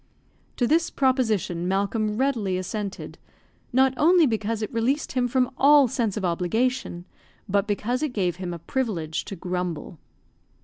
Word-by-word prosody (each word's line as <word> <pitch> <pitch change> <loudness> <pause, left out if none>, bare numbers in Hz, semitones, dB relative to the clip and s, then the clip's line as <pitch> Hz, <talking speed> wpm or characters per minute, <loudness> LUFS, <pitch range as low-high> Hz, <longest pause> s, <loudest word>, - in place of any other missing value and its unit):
To 245 - +2
this 325 +6 +2
proposition 220 -10 0
Malcolm 210 +3 0
readily 230 -8 0
assented, 195 +2 -5 0.5
not 265 +1 +3
only 340 +3 +5
because 220 -2 -1
it 215 - -5
released 250 +6 0
him 250 -1 +1
from 255 +1 +1
all 285 0 +6
sense 225 -4 -1
of 200 - -2
obligation, 180 +2 -1 0.4
but 200 +1 +1
because 225 +5 -1
it 305 -3 -1
gave 180 -6 -1
him 185 -1 -5
a 170 - -5
privilege 170 -5 -3
to 195 - -6
grumble. 180 -2 -4
220 Hz, 145 wpm, -25 LUFS, 185-255 Hz, 0.5 s, all